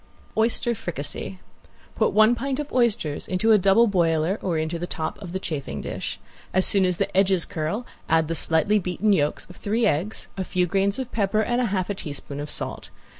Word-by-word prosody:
~OYSTER 230 +2 +1
FRICASSE~ 175 -2 -5 0.6
Put - - +2
one 215 +2 +6
pint 265 +3 -2
of 295 -1 -5
oysters 215 - +1
into 190 +5 +2
a 215 - +7
double 195 +5 +5
boiler 170 -2 +1
or 175 -4 -1
into 160 +2 -2
the 175 - -3
top 160 +4 -4
of 185 -4 -7
the 190 - -2
chafing 140 - -4
dish. - - -4 0.4
As 185 - +4
soon 195 -2 +3
as 180 -1 0
the 200 -1 -2
edges 190 -2 +3
curl 165 +10 -3 0.2
add 160 -1 +3
the 165 - -1
slightly 165 +6 +2
beaten 190 +3 +1
yolks 150 -5 0
of 180 - -13
three 220 +3 0
eggs, 180 +9 -1
a 190 - -1
few 180 -1 +1
grains 195 +2 +1
of 260 -2 -4
pepper 215 0 +1
and 240 +3 +1
half 195 -6 0
a 205 - -1
teaspoon 145 -5 -7
of 145 +1 -5
salt. - - -3
190 Hz, 200 wpm, -24 LUFS, 165-215 Hz, 0.6 s, a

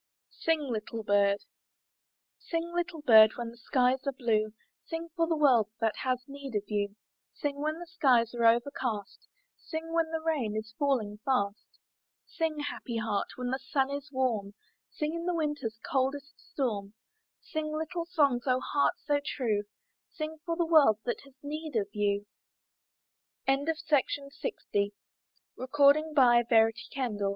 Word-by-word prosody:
SING, 325 -1 +2
LITTLE 230 -4 -4
BIRD 200 -1 +3 1.0
Sing, 335 0 -3
little 345 -3 -2
bird, 220 -4 +8
when 235 -1 -5
the 235 - -16
skies 250 +2 +2
are - - +2
blue; 220 -5 0 0.4
Sing, 330 0 -5
for 330 -1 +2
the 330 - +1
world 250 -8 +4 0.3
has 255 -1 -1
need 275 -3 -8
of 205 - 0
you; 205 -1 -1 0.4
Sing 285 -2 -2
when 310 +1 -1
the 345 - -7
skies 255 -10 +3
are 235 -1 0
overcast; 235 -3 0 0.3
Sing 325 0 -6
when 330 -1 +2
the 320 0 -2
rain 295 -10 -1
is 220 0 -5
falling 230 -8 0
fast. 205 -5 -1 0.5
Sing, 320 -2 -2
happy 255 -5 -4
heart, 215 -2 -1
when 250 -1 -3
the 265 - -1
sun 265 +1 0
is 285 +1 -5
warm; 225 -7 -1 0.3
Sing 300 +1 -3
in 335 0 -4
the 355 - +1
winter's 295 -8 -2
coldest 275 +2 -1 0.2
storm; 210 -7 -2 0.4
Sing 310 -1 -4
little 320 +2 -3
songs, 285 -8 +2
O 255 0 +3
heart 285 +2 +1
so 290 0 +2
true; 220 -8 -1 0.4
Sing, 310 0 -5
for 335 - 0
the 340 - +2
world 305 -10 +6
has 260 +2 -5
nee 210 -9 -1
265 Hz, 130 wpm, -30 LUFS, 220-310 Hz, 1.0 s, bird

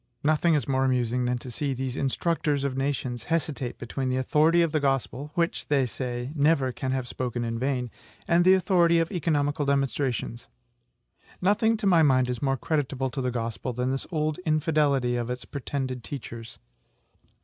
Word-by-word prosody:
Nothing 155 +2 +3
is 145 - -1
more 135 -1 +1
amusing 125 -1 +1
than 125 0 0
to 125 +1 -8
see 140 +1 -2
these 130 0 -3
INSTRUCTORS 145 +1 0
OF 140 -2 -1
NATIONS 135 -4 -2
hesitate 145 -6 -2
between 130 +2 -3
the 130 - 0
authority 155 +6 +3
of 165 - 0
the 155 - +1
Gospel, 135 +1 -1
which, 170 -1 -1
they 140 -3 +2
say, 125 +1 -4
NEVER 145 -3 +2
CAN 130 +1 -3
HAVE 130 -2 -2
SPOKEN 125 -1 -3
IN 115 0 -3
VAIN, 125 -2 -1 0.4
and 170 +1 +4
the 185 +1 +7
authority 175 -2 +3
of 165 0 +1
economical 145 -4 0
demonstrations. 135 -4 -1 0.9
Nothing, 210 +4 +2
to 210 - -4
my 175 -4 +5
mind, 130 -4 +4
is 125 - -5
more 135 -1 +1
creditable 135 -2 -1
to 135 0 -3
the 125 - 0
Gospel 115 +1 -3
than 125 +2 -1
this 135 - -3
old 155 0 -1
infidelity 150 -6 +1
of 120 0 -3
its 125 0 -4
pretended 130 -3 -4
teachers. 115 -4 -8
135 Hz, 175 wpm, -26 LUFS, 125-155 Hz, 0.9 s, the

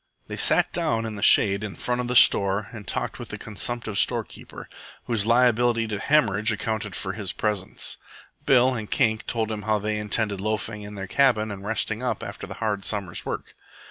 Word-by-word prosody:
They - - -6
sat - - +3
down 115 0 0
in 110 -1 -5
the 100 - -7
shade 100 0 +5
in 105 -3 -5
front 125 0 -2
of 125 - -4
the 125 - -2
store 100 -2 +5
and 105 -4 -9
talked - - -2
with - - -8
the - - -6
consumptive 110 0 -4
storekeeper, - - -3 0.4
whose 110 -3 0
liability 120 -1 +3
to 105 -2 -3
hemorrhage 110 -5 +2
accounted 110 -2 -3
for 95 -2 -4
his 100 -3 -3
presence. 105 -4 -2 0.5
Bill 130 0 +5
and 110 -4 -5
Kink 110 -4 +1
told 110 -2 -1
him 105 -1 -4
how 110 0 +1
they 105 +1 -2
intended 105 -1 -1
loafing 110 0 -3
in 105 0 -9
their 95 -1 -5
cabin 110 -1 +2
and 100 -1 -8
resting 110 +1 -2
up 125 - -2
after - - -7
the - - -8
hard 105 -3 -2
summer's 100 -5 -3
work. - - -5
110 Hz, 195 wpm, -24 LUFS, 105-115 Hz, 0.5 s, shade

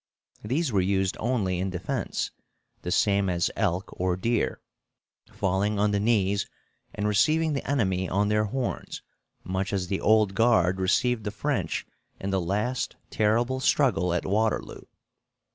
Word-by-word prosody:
These 135 +7 0
were 100 -3 +2
used 95 0 +1
only 105 -7 0
in 95 +1 -1
defense, 90 0 -3 0.5
the - - -5
same 100 +1 +2
as 85 -1 0
elk 95 -1 -1
or 90 0 0
deer, 115 +4 0 0.7
falling 100 +2 0
on 105 +1 +2
the 100 - +1
knees 100 -2 +1 0.5
and 105 +1 -1
receiving 155 +10 +3
the 140 - -4
enemy 95 -9 +1
on 100 +2 +1
their 105 0 +2
horns, 125 +4 -4 0.4
much 95 +1 -2
as 95 -3 -2
the 95 - -1
Old 110 -2 +4
Guard 95 -4 +3
received 115 +5 +1
the 105 - -2
French 135 +7 -2 0.3
in 95 - -3
the 95 -1 +1
last 105 +9 -1 0.2
terrible 120 +4 +1
struggle 130 -10 +2
at 85 - -1
Waterloo. 110 +3 -1
100 Hz, 145 wpm, -26 LUFS, 95-115 Hz, 0.7 s, Old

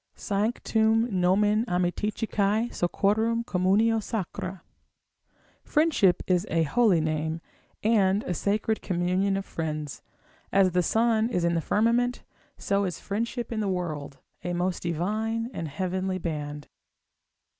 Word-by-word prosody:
Sanctum 220 +2 +1
nomen 205 +4 +3
amiciticae, 210 +4 0
sociorum 220 +6 +1
communio 210 +5 +2
sacra; 190 -3 -5 1.0
friendship 300 - +3
is 180 +2 +1
a 165 0 +2
holy 210 +2 +3
name, 155 +1 -1 0.4
and 205 -2 +3
a 180 - -2
sacred 210 +5 0
communion 185 +2 0
of 195 - -4
friends. 155 -3 -4 0.5
As 195 -2 +4
the 180 +1 +2
sun 225 +3 +2
is 180 -8 -1
in 170 0 +2
the 165 - +1
firmament, 235 +6 +1 0.3
so 200 0 0
is 180 -4 -4
friendship 235 +4 -3
in 225 - -2
the 210 - 0
world, 155 -7 -3 0.3
a 175 - -2
most 180 +1 -1
divine 215 +8 -2
and 165 - -4
heavenly 185 +4 -2
band. 150 -4 -5
195 Hz, 125 wpm, -27 LUFS, 175-220 Hz, 1.0 s, As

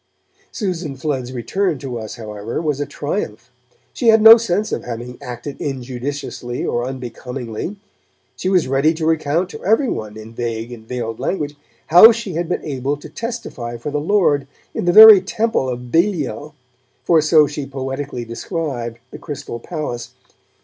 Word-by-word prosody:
Susan 175 - -3
Flood's 130 -3 -3
return 155 - -1
to 130 -4 -5
us, 110 -1 -7
however, 110 -1 -5
was 150 -3 -1
a 145 - -2
triumph; 125 - -4 0.4
she 240 - -2
had 220 0 +7
no 225 +1 +11
sense 215 -2 -1
of - - -2
having 120 +1 -6
acted 125 +3 -7
injudiciously 130 -1 -4
or 120 - -1
unbecomingly; 125 - -6 0.6
she 185 - -2
was 180 -7 +3
ready 140 +5 +2
to 160 0 -3
recount 160 +2 +1
to - - -10
every 225 +7 +2
one, 110 0 -5
in 110 +1 -10
vague 115 0 -4
and 110 -2 -11
veiled 115 -2 -4
language, 150 -6 -2 0.3
how 180 +8 +10
she 225 -5 -4
had 170 +1 -2
been - - -2
able 140 -1 -2
to 145 - -11
testify 225 - -5
for 130 +6 -5
the 145 0 -1
Lord 150 -6 +2 0.3
'in - - -3
the 175 - +4
very 215 0 +11
temple 210 - -1
of 125 -1 -6
Belial', 155 - 0 0.5
for 165 -2 +4
so 155 0 +5
she 145 -1 -5
poetically 135 -2 -5
described 120 -2 -4
the - - -9
Crystal 140 -6 -6
Palace. 145 -5 -5
145 Hz, 165 wpm, -19 LUFS, 120-170 Hz, 0.6 s, no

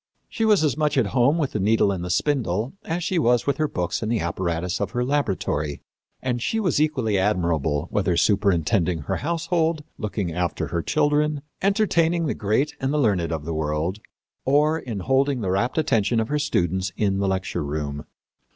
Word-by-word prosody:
She 225 - -1
was 210 -6 +4
as 150 -5 +2
much 150 -1 0
at 130 - +4
home 135 +5 +3
with 145 -5 -1
the - - -2
needle 105 +1 +3
and 90 -3 -3
the 90 - -4
spindle 115 - 0
as 170 +2 -2
she 180 0 0
was 120 -4 +3
with 140 - 0
her 155 - +1
books 90 - -2
and 110 0 -2
the 115 - +1
apparatus 85 0 -2
of - - -1
her 125 0 0
laboratory. 95 - -1 0.4
And 125 -2 -1
she 225 - 0
was 180 -8 +1
equally 130 -10 +1
admirable 85 -7 0
whether - - +1
superintending 90 -3 +2
her - - -2
household, 165 0 0 0.2
looking 100 -5 -3
after 90 0 -2
her 85 - -1
children, 150 - +1 0.2
entertaining 175 -5 +2
the 150 - 0
great 110 +8 0
and 135 0 -1
the 150 - 0
learned 100 - +1
of 80 -2 -3
the 85 - -3
world, 80 +5 -2 0.4
or 150 +4 +3
in 115 -9 -5
holding 135 +3 +1
the 95 -3 -1
rapt 115 - 0
attention 115 -7 +2
of 110 - -1
her 150 0 0
students 95 - 0
in 100 -2 +1
the 100 - +1
lecture 95 -4 -1
room. 75 0 -4
115 Hz, 190 wpm, -24 LUFS, 90-150 Hz, 0.4 s, was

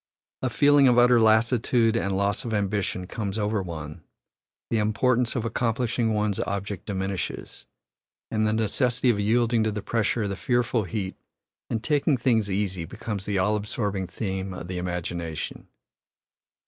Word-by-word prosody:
A 130 - 0
feeling 145 +1 +5
of 125 -1 +4
utter 120 0 +6
lassitude 115 +1 +3
and 100 -4 0
loss 100 +4 0
of 115 -3 -2
ambition 100 -2 -1
comes 100 +1 -4
over 105 -1 0
one; 80 -3 -7 0.7
the 115 - +2
importance 115 +3 +1
of 115 -2 -1
accomplishing 115 0 0
one's 105 -1 0
object 100 0 -3
diminishes, 95 -2 -4 0.6
and 110 -1 +1
the 110 - +1
necessity 120 +3 +2
of 105 - -2
yielding 115 +2 +2
to 110 - 0
the 105 0 -5
pressure 115 0 0
of 100 - -2
the 100 - -2
fearful 120 0 0
heat 95 +1 -4 0.5
and 110 0 -2
taking 145 0 +2
things 115 -4 +2
easy 95 -3 -1
becomes 100 +4 -5
the 100 -1 -1
all 105 +3 +2
absorbing 105 -2 -2
theme 95 0 -4
of 90 0 -8
the 90 -1 -3
imagination. 85 -2 -4
105 Hz, 155 wpm, -26 LUFS, 95-115 Hz, 0.7 s, utter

